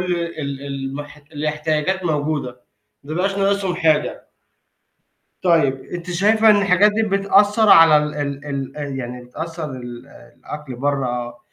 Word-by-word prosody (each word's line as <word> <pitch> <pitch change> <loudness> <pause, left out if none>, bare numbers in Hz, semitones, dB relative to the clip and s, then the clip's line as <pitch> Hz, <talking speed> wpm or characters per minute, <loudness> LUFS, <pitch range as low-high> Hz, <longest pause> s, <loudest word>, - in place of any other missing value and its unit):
ال 170 -1 -4
ال 140 -1 -5
المح 140 +2 -6 0.2
الاحتياجات 155 +4 -1
موجودة، 145 -5 -2 0.4
ما 145 - -9
يبقاش 195 +4 -1
ناقصهم 195 -2 0
حاجة. 160 -3 0 1.2
طيب. 155 -7 +2
أنتِ 175 0 -7
شايفة 215 +5 +4
إن 210 - +6
الحاجات 200 +1 +4
دي 225 - 0
بتأثّر 205 +1 +3
على 165 -4 +8
ال 150 0 0
ال 145 -1 -4
ال 135 -1 -5
آآ 150 - -4
يعني 125 -2 -6
بتأثّر 160 +4 -6
ال 120 -2 -9
الأكل 145 +3 -10
برّه 125 -3 -2
150 Hz, 135 wpm, -20 LUFS, 135-180 Hz, 1.2 s, على